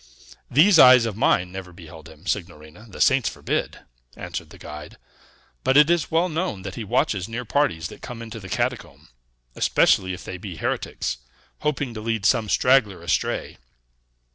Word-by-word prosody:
"These 165 +6 +5
eyes 125 -3 +8
of 110 -3 -3
mine 90 -4 +1
never 95 -1 -8
beheld 80 -3 -13
him, 80 0 -17
signorina; 85 +2 -5
the - - -11
saints - - +3
forbid!" - - -3 0.4
answered - - -6
the - - -14
guide. 75 0 -10 0.7
"But 130 - +3
it 150 +3 +6
is 175 -2 +1
well 165 +3 +2
known 160 - -3
that 100 -1 -6
he 115 - -6
watches 100 -1 0
near 120 +2 -5
parties 105 - 0
that - - -13
come 120 -2 -8
into 115 0 -8
the 95 -2 -10
catacomb, - - -3 0.4
especially 95 +8 +2
if 90 - -8
they 95 - -7
be 95 -2 -7
heretics, 65 - -3 0.4
hoping 145 -4 -2
to 110 - -7
lead 110 -2 -2
some 110 -2 +2
straggler 110 -10 +2
astray. 85 - -2
105 Hz, 165 wpm, -23 LUFS, 90-130 Hz, 0.7 s, eyes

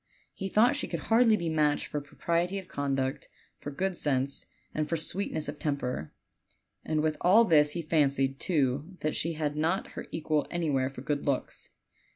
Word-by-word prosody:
He 195 -1 -4
thought 220 +5 +4
she - - -1
could - - -3
hardly 225 -1 +6
be 170 - -3
matched 155 -2 +1
for 150 - -4
propriety 170 +6 -1
of 190 -2 -7
conduct, 135 -2 -2 0.3
for - - -6
good 185 +6 -2
sense, 140 -3 +1 0.3
and 155 -1 -1
for 165 - 0
sweetness 160 -1 -2
of 145 0 -6
temper; 125 - -2 0.7
and 155 -1 0
with 155 0 0
all 210 +6 +6
this 150 -5 +4
he 170 - -3
fancied, 140 -4 +1
too, 145 +1 0
that 155 - 0
she 165 +1 0
had 150 -2 -2
not 165 +5 0
her - - -8
equal 155 -2 0
anywhere 145 -7 0
for 135 -2 -9
good 145 +1 -2
looks. 140 -2 -2
155 Hz, 180 wpm, -29 LUFS, 140-170 Hz, 0.7 s, hardly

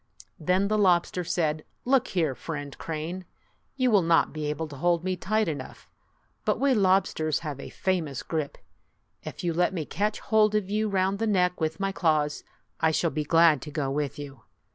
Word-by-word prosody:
Then 185 +5 +2
the 215 +1 +1
lobster 180 -2 +2
said, 155 -2 -1 0.2
"Look 260 0 +3
here, 160 -7 0
Friend 145 0 -6
Crane, 165 +3 -4 0.5
you 255 -2 +2
will 205 -3 +5
not 165 -1 +3
be 155 -1 -3
able 150 +2 -3
to 145 - -9
hold 170 +3 +1
me 185 0 -1
tight 215 +4 0
enough; 155 -3 -6 0.5
but - - 0
we 275 -1 +3
lobsters 185 - +2
have 150 -4 -5
a - - -7
famous 165 -9 -2
grip. 155 -4 -3 0.7
If - - -7
you 170 -1 0
let 180 +3 +1
me 160 -4 -2
catch 210 +7 -1
hold 215 -1 +3
of 200 -2 -1
you 215 +1 +1
round 195 0 +1
the 225 - 0
neck 180 -4 +1
with 160 +2 -1
my 195 0 0
claws, 155 -5 0 0.4
I 160 - +3
shall 160 +1 +1
be 155 - -2
glad 165 -2 +4
to 150 - -7
go 145 -3 -2
with 145 0 -2
you." 140 -4 -9
170 Hz, 190 wpm, -27 LUFS, 155-195 Hz, 0.7 s, will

